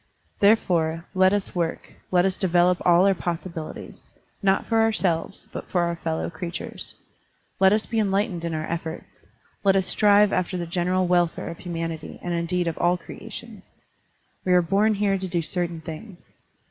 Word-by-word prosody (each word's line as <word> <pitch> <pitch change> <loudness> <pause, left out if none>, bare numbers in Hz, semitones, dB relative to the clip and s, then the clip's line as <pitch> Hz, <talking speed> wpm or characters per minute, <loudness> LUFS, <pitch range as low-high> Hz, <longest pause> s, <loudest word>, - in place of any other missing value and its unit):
Therefore, 170 -6 +2
let 185 0 +5
us 205 -1 -1
work, 170 -2 -3 0.2
let 180 0 +3
us 190 -1 +1
develop 180 -1 +3
all 175 +1 +5
our 200 - +5
possibilities; 170 -2 -6 0.3
not 195 -1 +2
for 225 -1 +2
ourselves, 195 -5 0
but - - -7
for 180 - +1
our 170 0 0
fellow 160 -1 -2
creatures. 170 +1 -6 0.6
Let 190 0 +6
us 215 +1 +2
be 225 - -1
enlightened 195 -3 0
in 165 -1 -2
our 155 0 -2
efforts, 165 -1 -6 0.4
let 195 -1 +4
us 190 -1 +2
strive 205 0 +4
after 185 0 0
the 175 - -3
general 180 +2 0
welfare 175 -2 +1
of 170 - -8
himianity 165 -3 -5
and 175 - -2
indeed 170 +1 0
of 165 - -3
all 175 +1 +3
creations. - - -10 0.7
We 180 - +2
are 180 -1 +5
bom 205 +5 +2
here 200 -1 +1
to 190 - -4
do 175 -2 -1
certain 170 -1 -2
things. 175 +4 -10
180 Hz, 170 wpm, -24 LUFS, 170-195 Hz, 0.7 s, Let